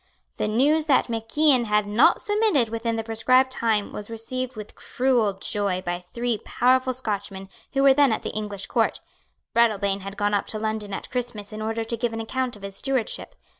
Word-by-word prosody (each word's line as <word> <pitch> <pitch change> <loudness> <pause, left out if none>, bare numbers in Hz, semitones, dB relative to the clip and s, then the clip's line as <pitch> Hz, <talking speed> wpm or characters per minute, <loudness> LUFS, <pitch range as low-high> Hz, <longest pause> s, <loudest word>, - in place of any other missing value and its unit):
The - - 0
news 290 +8 +2
that 270 -4 +3
Mac 225 +2 -5
Ian 285 -6 +5
had 210 -1 +2
not 210 +6 +4
submitted 415 - +2
within 230 0 -2
the 225 - -2
prescribed 255 +4 +3
time 220 -5 0
was 210 +1 -7
received 255 +3 -5
with 215 -1 -8
cruel 245 -5 +1
joy 195 -1 -2
by 175 0 -2
three 235 +5 -3
powerful 255 +1 +2
Scotchmen 200 -6 -4 0.2
who 275 0 +2
were 275 -1 +7
then 280 -2 +4
at 220 - -1
the - - -3
English 205 -2 -4
Court. - - 0 0.5
Breadalbane 205 -4 +2
had 195 +1 -8
gone 205 0 0
up 200 - 0
to 215 - -3
London 215 -1 -3
at 195 - -6
Christmas 235 -5 -4
in 215 - -6
order 225 +1 -2
to 230 +1 -4
give 235 0 -1
an 225 - -4
account 250 +2 -2
of 205 - -15
his 195 0 -6
stewardship. 265 -4 -2
225 Hz, 200 wpm, -24 LUFS, 205-255 Hz, 0.5 s, were